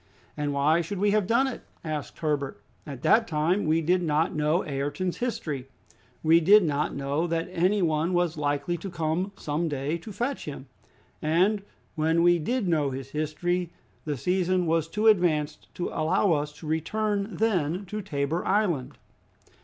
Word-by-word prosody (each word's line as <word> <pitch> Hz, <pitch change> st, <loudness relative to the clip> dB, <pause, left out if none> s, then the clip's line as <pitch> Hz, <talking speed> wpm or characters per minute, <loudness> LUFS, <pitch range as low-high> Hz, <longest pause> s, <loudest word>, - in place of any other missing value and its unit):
"And 150 Hz, -1 st, -2 dB
why 150 Hz, +4 st, +3 dB
should 180 Hz, +4 st, -5 dB
we 205 Hz, +2 st, +2 dB
have 210 Hz, -3 st, +2 dB
done 235 Hz, +4 st, +3 dB
it?" 265 Hz, -, -4 dB, 0.2 s
asked 155 Hz, -2 st, -4 dB
Herbert. 145 Hz, -3 st, -2 dB, 0.3 s
"At 135 Hz, -3 st, -8 dB
that 225 Hz, 0 st, +4 dB
time 165 Hz, +5 st, +1 dB
we 160 Hz, +1 st, +3 dB
did 180 Hz, +3 st, +2 dB
not 160 Hz, 0 st, +1 dB
know 155 Hz, +3 st, +1 dB
Ayrton's 145 Hz, +6 st, -2 dB
history; 150 Hz, -, -3 dB, 0.6 s
we 165 Hz, +1 st, +6 dB
did 200 Hz, +5 st, +6 dB
not 150 Hz, -2 st, -1 dB
know 140 Hz, +4 st, -1 dB
that 165 Hz, 0 st, -1 dB
any 185 Hz, +3 st, +2 dB
one 160 Hz, +1 st, +1 dB
was 175 Hz, -2 st, +1 dB
likely 145 Hz, +3 st, -1 dB
to 195 Hz, +4 st, -6 dB
come 170 Hz, +3 st, -1 dB
some 155 Hz, +3 st, -2 dB
day 145 Hz, +3 st, -2 dB
to 210 Hz, -, -9 dB
fetch 240 Hz, +7 st, -3 dB
him, 140 Hz, -2 st, -7 dB, 0.6 s
and 185 Hz, +7 st, +2 dB, 0.3 s
when 160 Hz, +2 st, +2 dB
we 175 Hz, 0 st, +5 dB
did 230 Hz, +6 st, -1 dB
know 155 Hz, -5 st, +2 dB
his 135 Hz, 0 st, -6 dB
history, 170 Hz, +4 st, -1 dB, 0.4 s
the 150 Hz, -3 st, -2 dB
season 180 Hz, +3 st, +1 dB
was 165 Hz, -1 st, +1 dB
too 210 Hz, +6 st, -2 dB
advanced 160 Hz, -8 st, +2 dB
to 175 Hz, -, -2 dB
allow 165 Hz, +5 st, +1 dB
us 150 Hz, -1 st, 0 dB
to 150 Hz, -, -12 dB
return 200 Hz, +6 st, -1 dB
then 185 Hz, -4 st, 0 dB
to 210 Hz, +3 st, -5 dB
Tabor 145 Hz, 0 st, -2 dB
Island." 185 Hz, -10 st, 0 dB
165 Hz, 170 wpm, -27 LUFS, 150-185 Hz, 0.6 s, we